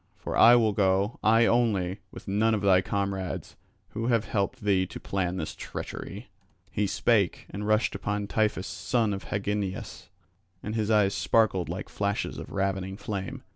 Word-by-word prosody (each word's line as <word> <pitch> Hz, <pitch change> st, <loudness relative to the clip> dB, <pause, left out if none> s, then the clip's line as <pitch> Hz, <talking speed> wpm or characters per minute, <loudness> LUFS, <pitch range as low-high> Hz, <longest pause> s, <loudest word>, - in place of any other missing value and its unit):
For -, -, -5 dB
I 120 Hz, +1 st, +8 dB
will 110 Hz, -3 st, +3 dB
go, 100 Hz, +2 st, +1 dB
I 115 Hz, +2 st, +5 dB
only, 105 Hz, -6 st, +1 dB
with -, -, -12 dB
none 110 Hz, +3 st, +2 dB
of 105 Hz, -, -2 dB
thy 95 Hz, -2 st, +5 dB
comrades, 100 Hz, -1 st, -3 dB, 0.3 s
who 115 Hz, +2 st, -3 dB
have 115 Hz, -3 st, +2 dB
helped 105 Hz, +5 st, -2 dB
thee 95 Hz, -3 st, +2 dB
to -, -, -8 dB
plan 95 Hz, -2 st, -2 dB
this 80 Hz, -, -4 dB
treachery." -, -, -7 dB, 0.4 s
He 105 Hz, 0 st, 0 dB
spake, 105 Hz, -3 st, +1 dB
and 105 Hz, +2 st, -4 dB
rushed 110 Hz, +1 st, +2 dB
upon 105 Hz, 0 st, -2 dB
Tiphys 105 Hz, -2 st, 0 dB
son 115 Hz, +1 st, 0 dB
of 95 Hz, -, -6 dB
Hagnias; 105 Hz, +1 st, -3 dB, 0.5 s
and 105 Hz, -, -4 dB
his 110 Hz, -1 st, -1 dB
eyes 105 Hz, -3 st, +4 dB
sparkled 105 Hz, -7 st, +2 dB
like 95 Hz, +4 st, -4 dB
flashes 100 Hz, +1 st, -2 dB
of -, -, -8 dB
ravening 95 Hz, 0 st, -2 dB
flame. 100 Hz, -2 st, -5 dB
100 Hz, 165 wpm, -27 LUFS, 95-110 Hz, 0.5 s, I